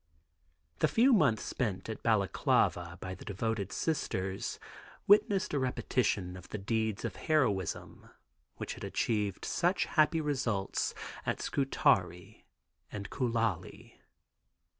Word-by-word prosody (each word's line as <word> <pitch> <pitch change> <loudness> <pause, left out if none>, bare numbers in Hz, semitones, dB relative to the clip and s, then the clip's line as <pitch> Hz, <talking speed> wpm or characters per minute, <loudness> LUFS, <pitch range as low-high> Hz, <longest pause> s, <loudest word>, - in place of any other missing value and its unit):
The - - +4
few 250 +4 +4
months 140 - +3
spent 105 -7 -2
at 110 - -5
Balaklava 95 -4 +1
by 95 0 -5
the 95 - -10
devoted 105 0 -2
Sisters 95 - -2 0.5
witnessed 200 -3 +4
a 145 - +2
repetition 115 -7 0
of 90 -1 -11
the - - -4
deeds 110 +1 -1
of 115 - -4
heroism 110 - -1 0.5
which - - -5
had - - -10
achieved 105 -4 -1
such 180 +2 +1
happy 160 +1 +3
results 130 -10 -1 0.3
at - - -1
Scutari 100 - 0 0.4
and 100 -1 -6
Koulali. 115 -8 -2
110 Hz, 115 wpm, -32 LUFS, 95-140 Hz, 0.5 s, The